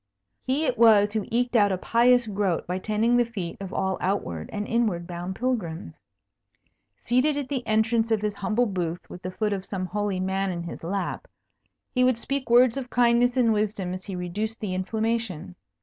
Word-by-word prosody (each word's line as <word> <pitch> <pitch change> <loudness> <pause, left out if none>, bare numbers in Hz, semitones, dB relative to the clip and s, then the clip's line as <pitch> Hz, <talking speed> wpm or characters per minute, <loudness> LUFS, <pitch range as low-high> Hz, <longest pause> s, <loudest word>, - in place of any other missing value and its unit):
He 275 +5 0
it 245 -5 -1
was 210 -3 +6
who 215 -2 -2
eked 245 +1 0
out 205 -3 +5
a 190 - 0
pious 240 +5 +3
groat 200 -5 -1
by 180 +1 -3
tending 220 +4 +1
the 240 - +5
feet 200 -8 -5
of 190 -1 -6
all 190 0 -1
outward 130 - -2
and 205 0 -3
inward 215 -7 0
bound 175 +1 -5
pilgrims. 185 - -3 1.0
Seated 260 +5 +2
at 280 -3 -3
the 275 -3 -1
entrance 225 +1 +2
of 220 -2 +1
his 210 -1 0
humble 215 +4 0
booth, 180 -4 -3
with 180 - -9
the 185 - -4
foot 210 +3 -1
of 195 -2 -3
some 190 -2 -4
holy 205 0 -2
man 190 +1 -1
in 170 -1 -4
his 170 - -8
lap, 200 - -3 0.7
he 255 - +3
would 250 -2 +3
speak 275 +1 -3
words 245 +1 +5
of 255 -2 -5
kindness 245 +1 +3
and 230 -3 +4
wisdom 210 -3 -1
as 185 0 -7
he 195 - -5
reduced 205 +6 -3
the 200 -4 -3
inflammation. 200 -2 -2
210 Hz, 195 wpm, -25 LUFS, 185-235 Hz, 1.0 s, was